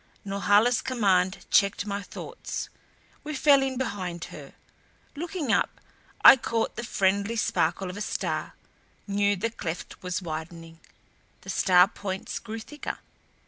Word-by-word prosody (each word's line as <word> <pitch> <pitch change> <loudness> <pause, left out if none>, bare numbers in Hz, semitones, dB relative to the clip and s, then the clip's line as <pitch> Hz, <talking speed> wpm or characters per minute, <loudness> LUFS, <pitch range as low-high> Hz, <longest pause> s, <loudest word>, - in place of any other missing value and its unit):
Norhala's 205 +4 +3
command 190 -7 +1
checked 200 0 +3
my 200 -1 -3
thoughts; - - -6 0.5
we 305 0 -5
fell 280 0 +5
in 265 -1 -1
behind 185 -9 -3
her. - - -10 0.6
Looking 320 -4 -3
up - - 0 0.5
I - - +12
caught 230 -2 -1
the 235 - -5
friendly 200 0 +1
sparkle 185 -4 0
of 180 +2 -6
a - - -5
star; - - -3 0.5
knew 205 0 +1
the 225 +4 -2
cleft 170 -6 -6
was 180 -1 -2
widening. 165 -1 -7 0.6
The - - -6
star 180 -1 +5
points 190 -2 -5
grew 225 0 -7
thicker. 295 +6 -6
200 Hz, 135 wpm, -27 LUFS, 185-230 Hz, 0.6 s, I